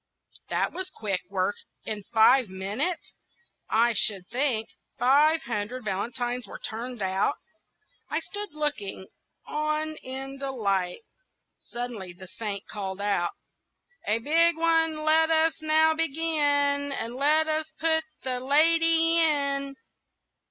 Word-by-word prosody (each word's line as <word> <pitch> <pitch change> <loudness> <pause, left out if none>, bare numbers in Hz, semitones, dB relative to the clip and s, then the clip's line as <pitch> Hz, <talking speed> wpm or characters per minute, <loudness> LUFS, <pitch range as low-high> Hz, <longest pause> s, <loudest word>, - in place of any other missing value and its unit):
That - - 0
was 375 0 -4
quick 205 - -3
work! 195 0 0 0.3
in 215 -1 -4
five 235 +1 +5
minutes, 200 - -3 0.6
I 235 +2 +3
should 200 -3 +1
think, 240 -3 0 0.3
five 300 +5 +4
hundred 235 +2 -4
valentines 240 +4 -2
were - - -8
turned 235 0 -5
out. 190 +8 +1 0.7
I - - 0
stood 415 0 -6
looking 295 -11 -3 0.4
on 305 +1 -2
in 270 +1 -7
delight. 200 - -1 0.6
Suddenly 235 -7 -6
the 185 +1 -12
Saint 205 0 -5
called 195 -2 -5
out,— 200 -4 0 0.7
"A 215 - +3
big 325 +7 +3
one 325 -1 +2
let 320 +1 +4
us 320 0 +2
now 315 +1 +4
begin, 290 -3 +1
And 235 -3 -4
let 300 +4 +3
us 315 0 -1
put 320 0 +2 0.2
the 255 -1 -2
lady 330 +4 +3
in!" 280 -3 +1
270 Hz, 120 wpm, -27 LUFS, 215-315 Hz, 0.7 s, five